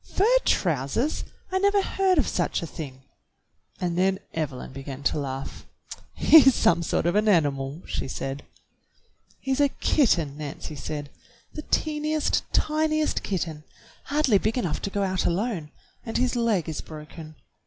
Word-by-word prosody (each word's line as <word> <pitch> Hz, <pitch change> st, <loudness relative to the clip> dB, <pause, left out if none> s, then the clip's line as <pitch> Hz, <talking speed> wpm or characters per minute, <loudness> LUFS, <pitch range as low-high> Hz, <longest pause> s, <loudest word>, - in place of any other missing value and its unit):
"Fur 390 Hz, -, +3 dB, 0.2 s
trousers! 170 Hz, -, 0 dB, 0.3 s
I 375 Hz, -, +1 dB
never 400 Hz, 0 st, +3 dB
heard 380 Hz, -2 st, +1 dB
of 285 Hz, -, +3 dB
such 175 Hz, -1 st, -1 dB
a -, -, -2 dB
thing." 140 Hz, -5 st, -8 dB, 0.8 s
And 175 Hz, -2 st, -1 dB
then 190 Hz, +1 st, +3 dB, 0.2 s
Evelyn 140 Hz, -5 st, -4 dB
began 135 Hz, 0 st, -7 dB
to 150 Hz, -, +1 dB
laugh. 135 Hz, -1 st, -6 dB, 0.5 s
"He's 270 Hz, -5 st, +7 dB
some 170 Hz, 0 st, +3 dB
sort 165 Hz, -, -1 dB
of 175 Hz, -, +2 dB
an 210 Hz, +2 st, +2 dB
animal," 145 Hz, -4 st, +1 dB
she -, -, -3 dB
said. 135 Hz, +1 st, -4 dB, 1.0 s
"He's 270 Hz, 0 st, -1 dB
a 285 Hz, -1 st, +4 dB
kitten," 170 Hz, -, +1 dB
Nancy 150 Hz, +1 st, -6 dB
said. 145 Hz, +1 st, -5 dB, 0.4 s
"The 305 Hz, -, -5 dB
teentiest, 305 Hz, 0 st, 0 dB
tiniest 310 Hz, 0 st, +1 dB
kitten, 165 Hz, -5 st, -3 dB, 0.4 s
hardly 280 Hz, -8 st, +3 dB
big 220 Hz, +5 st, -1 dB
enough 175 Hz, -11 st, -1 dB
to -, -, -2 dB
go 200 Hz, 0 st, -1 dB
out 185 Hz, -1 st, 0 dB
alone, 175 Hz, -4 st, -1 dB, 0.3 s
and 225 Hz, -, -3 dB
his 250 Hz, +1 st, +1 dB
leg 225 Hz, -8 st, +1 dB
is 160 Hz, -, -4 dB
broken. 155 Hz, 0 st, -10 dB
180 Hz, 150 wpm, -25 LUFS, -, 1.0 s, He's